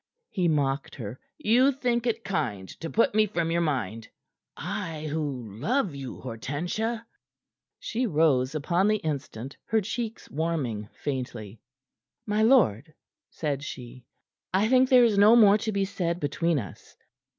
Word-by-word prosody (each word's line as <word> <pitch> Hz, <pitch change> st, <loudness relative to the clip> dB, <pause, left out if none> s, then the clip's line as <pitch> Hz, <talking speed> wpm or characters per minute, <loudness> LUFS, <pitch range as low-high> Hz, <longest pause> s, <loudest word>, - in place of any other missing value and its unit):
he 180 Hz, -4 st, +1 dB
mocked 140 Hz, -3 st, 0 dB
her. 115 Hz, -1 st, -7 dB, 0.2 s
"You 255 Hz, 0 st, +4 dB
think 245 Hz, -3 st, -1 dB
it 230 Hz, 0 st, -1 dB
kind 115 Hz, -, -2 dB
to 165 Hz, -, -5 dB
put 230 Hz, +3 st, +2 dB
me 215 Hz, 0 st, +4 dB
from 170 Hz, -4 st, -1 dB
your 170 Hz, +1 st, +1 dB
mind 115 Hz, -, -2 dB, 0.5 s
I 170 Hz, -4 st, -4 dB
who 130 Hz, -9 st, -4 dB
love 225 Hz, -, 0 dB
you, 135 Hz, -2 st, -7 dB
Hortensia!" 175 Hz, -, -3 dB, 0.7 s
She 245 Hz, +2 st, -2 dB
rose 150 Hz, -, +2 dB
upon 175 Hz, +6 st, +1 dB
the 215 Hz, -, +3 dB
instant, 140 Hz, -, -5 dB
her 225 Hz, -, +2 dB
cheeks 225 Hz, +2 st, -4 dB
warming 135 Hz, -10 st, -2 dB
faintly. 120 Hz, -6 st, -5 dB, 0.6 s
"My 210 Hz, 0 st, 0 dB
lord," 175 Hz, -, +3 dB, 0.3 s
said 145 Hz, -3 st, -3 dB
she, 125 Hz, -3 st, -9 dB, 0.4 s
"I 195 Hz, +3 st, +2 dB
think 255 Hz, +1 st, +4 dB
there 250 Hz, -2 st, +7 dB
is 210 Hz, -4 st, +2 dB
no 215 Hz, +3 st, +8 dB
more 210 Hz, -3 st, +7 dB
to 220 Hz, +1 st, -2 dB
be 200 Hz, -1 st, 0 dB
said 175 Hz, -3 st, -2 dB
between 165 Hz, +2 st, 0 dB
us." 100 Hz, -10 st, -8 dB
165 Hz, 145 wpm, -27 LUFS, 135-215 Hz, 0.7 s, no